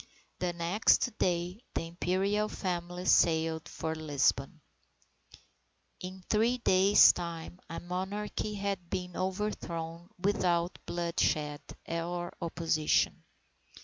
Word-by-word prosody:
The 180 -1 0
next 175 +7 +2
day 180 +3 0
the - - 0
Imperial 190 +5 0
Family 180 -1 -3
sailed 160 -2 +3
for 160 - -3
Lisbon. 150 0 0 1.4
In 185 +1 -8
three 230 +3 +2
days' 200 -3 +6
time 170 0 -6
a 165 - -4
monarchy 200 +4 -3
had 195 -3 -3
been 180 -1 -4
overthrown 175 -3 -3
without 180 -2 +1
bloodshed 160 -3 0 0.3
or 175 +1 -3
opposition. 165 -2 +1
175 Hz, 95 wpm, -31 LUFS, 165-190 Hz, 1.4 s, days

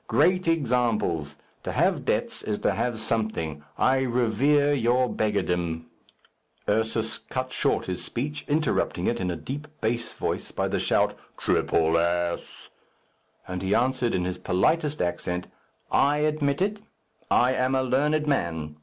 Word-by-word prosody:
Great 185 -1 +3
examples. 115 - +1 0.3
To - - -4
have - - +1
debts - - 0
is 105 -1 -2
to - - +4
have 120 -2 -1
something. 110 -10 -2
I 130 0 +3
revere 130 +4 +2
your 125 -1 +2
beggardom." 90 -7 -1 0.8
Ursus 110 +1 0
cut 130 0 -4
short - - +1
his 90 -1 -3
speech, 145 +4 -3
interrupting 155 +1 0
it - - 0
in 90 - -1
a 90 - -1
deep 135 - -6
bass 115 +1 -1
voice - - -3
by - - -1
the - - 0
shout, - - +2 0.2
"Triple 80 0 +2
ass!" 85 0 -2 0.8
And 90 0 -4
he 95 +2 +1
answered 125 -1 +1
in 90 -1 0
his 90 0 -3
politest 150 - +1
accent, 90 0 -2 0.5
"I 145 +1 +4
admit 150 +1 +1
it. 205 +1 -2 0.5
I 125 +1 +4
am 130 +1 +1
a 130 - +2
learned 150 +4 +1
man. 80 - -1
120 Hz, 145 wpm, -26 LUFS, 90-140 Hz, 0.8 s, to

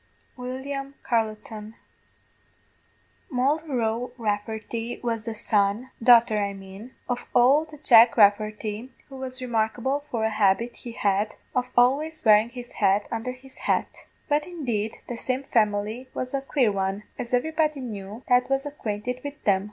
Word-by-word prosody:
WILLIAM 275 +2 -5
CARLETON. 220 -1 -2 1.5
"Moll 270 +4 +2
Roe 245 -5 -2
Rafferty 220 +1 -3
was 230 -2 -2
the 230 -1 -4
son 210 +2 0
daughter 230 -2 +6
I 200 -1 -1
mane 195 +5 -11
of 245 -1 -3
ould 295 +5 +3
Jack 230 -1 +7
Rafferty, 215 +3 +2 0.2
who 270 - -9
was 260 -1 -5
remarkable 240 +3 0
for 230 -2 -1
a 220 - +1
habit 215 +3 +2
he 235 - -8
had 205 0 0 0.2
of 250 0 +1
always 290 +5 +2
wearing 215 +1 +6
his 245 0 -9
head 200 0 +2
undher 230 +2 -3
his 260 +1 -15
hat; - - -1 0.2
but 295 +2 +1
indeed 240 -11 -3
the 240 - -5
same 255 +3 -2
family 215 +1 0
was 255 +1 -4
a 275 - 0
quare 270 -4 +2
one, 195 +1 -2 0.2
as 240 - -5
everybody 305 +3 +1
knew 215 -2 -7
that 250 0 +3
was 270 +1 0
acquainted 250 -3 -4
wid 285 0 -5
them. 195 -2 +4
240 Hz, 145 wpm, -25 LUFS, 215-260 Hz, 1.5 s, Jack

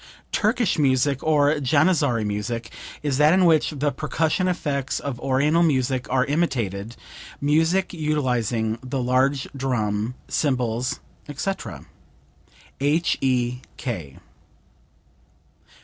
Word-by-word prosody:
["Turkish" 215 -4 +1
music, 135 -1 +2
or 145 -2 +3
"Janizary" 145 -4 +2
music, 110 +3 -3 0.3
is 140 -2 0
that 150 +4 +6
in 185 -1 +4
which 160 -3 +4
the 145 -1 -1
percussion 160 +5 0
effects 145 -7 -1
of 135 -4 -5
Oriental 145 +5 +2
music 130 -5 +1
are 130 0 +2
imitated 120 - -1 0.4
music 160 +7 +2
utilizing 125 - 0
the 130 +1 -3
large 130 +2 +1
drum, 115 -3 -1
cymbals, 125 -4 -1 0.3
etc. 190 +7 -4 0.9
H.E.K. 125 - -1
135 Hz, 95 wpm, -23 LUFS, 125-155 Hz, 0.9 s, that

